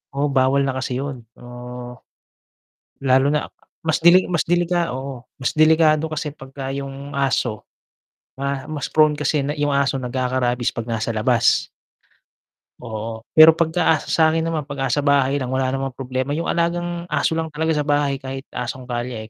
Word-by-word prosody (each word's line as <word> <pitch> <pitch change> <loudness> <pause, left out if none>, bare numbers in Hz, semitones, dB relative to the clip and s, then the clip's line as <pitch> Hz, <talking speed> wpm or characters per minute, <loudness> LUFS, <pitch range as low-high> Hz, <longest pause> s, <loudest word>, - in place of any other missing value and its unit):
Oo 145 +1 +1
bawal 135 +1 +2
na 130 - -2
kasi 130 -1 -3
yun 135 -4 -5
so, 120 0 -10 1.0
lalo 130 0 +3
na 150 0 0 0.4
mas 160 0 +1
delik 180 +2 +6
mas 170 - +2
delika 175 0 +1
oo 130 -1 -6 0.2
mas 130 - -2
delikado 155 0 +4
kasi 150 -1 -3
pagka 135 -1 -7
yung 140 +1 -7
aso, 130 -5 0 0.8
ma 140 0 -3
mas 150 -3 -4
prone 155 -1 +4
kasi 150 0 0
na 145 +2 -3
yung 145 -1 0
aso 140 -1 +1
nagkaka-rabies 125 -1 -1
'pag 115 -1 -4
nasa 115 -1 -2
labas. 115 +1 +2 1.2
Oo 110 -1 -6
pero 160 0 +8
pagka 160 -1 +1
sa 160 -1 +3
'kin 165 - +1
naman, 160 -3 -2
'pag 135 -3 -2
asa 145 - +1
bahay 140 -1 +2
lang 130 - -3
wala 130 0 0
namang 135 -1 -3
problema 130 +2 -3
yung 165 +2 -1
alagang 175 0 -1
aso - - 0
lang 160 0 -1
talaga 160 +1 -1
sa 150 -2 -1
bahay, 145 -2 +1
kahit 135 0 -6
asong 125 +1 -5
kalye 120 -2 -5
140 Hz, 165 wpm, -21 LUFS, 130-155 Hz, 1.2 s, pero